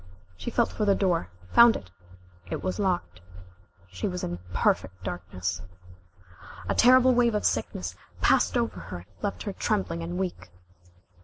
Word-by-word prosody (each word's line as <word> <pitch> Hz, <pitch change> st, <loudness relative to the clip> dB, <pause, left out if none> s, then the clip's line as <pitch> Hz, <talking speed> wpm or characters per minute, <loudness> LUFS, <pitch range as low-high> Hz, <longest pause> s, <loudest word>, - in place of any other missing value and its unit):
She -, -, -5 dB
felt 235 Hz, 0 st, +1 dB
for 215 Hz, -, -2 dB
the 200 Hz, -1 st, +4 dB
door, 175 Hz, -, +1 dB, 0.2 s
found 235 Hz, -1 st, +8 dB
it 95 Hz, -, -8 dB, 0.6 s
it -, -, -4 dB
was 185 Hz, +3 st, -2 dB
locked. 175 Hz, -, -1 dB, 0.7 s
She 95 Hz, -, -3 dB
was 180 Hz, -2 st, -4 dB
in 85 Hz, 0 st, -3 dB
perfect 95 Hz, +1 st, 0 dB
darkness. 90 Hz, -1 st, -4 dB, 1.1 s
A -, -, +1 dB
terrible 255 Hz, +1 st, +6 dB
wave 240 Hz, -2 st, +3 dB
of 210 Hz, -, -1 dB
sickness 90 Hz, -5 st, -1 dB, 0.2 s
passed -, -, +3 dB
over -, -, -1 dB
her 90 Hz, -, -7 dB
and 85 Hz, -, -12 dB, 0.2 s
left 205 Hz, -, -3 dB
her 200 Hz, -, -4 dB
trembling 190 Hz, -6 st, -1 dB
and 170 Hz, +2 st, -4 dB
weak. 175 Hz, -, -4 dB
175 Hz, 155 wpm, -27 LUFS, -, 1.1 s, found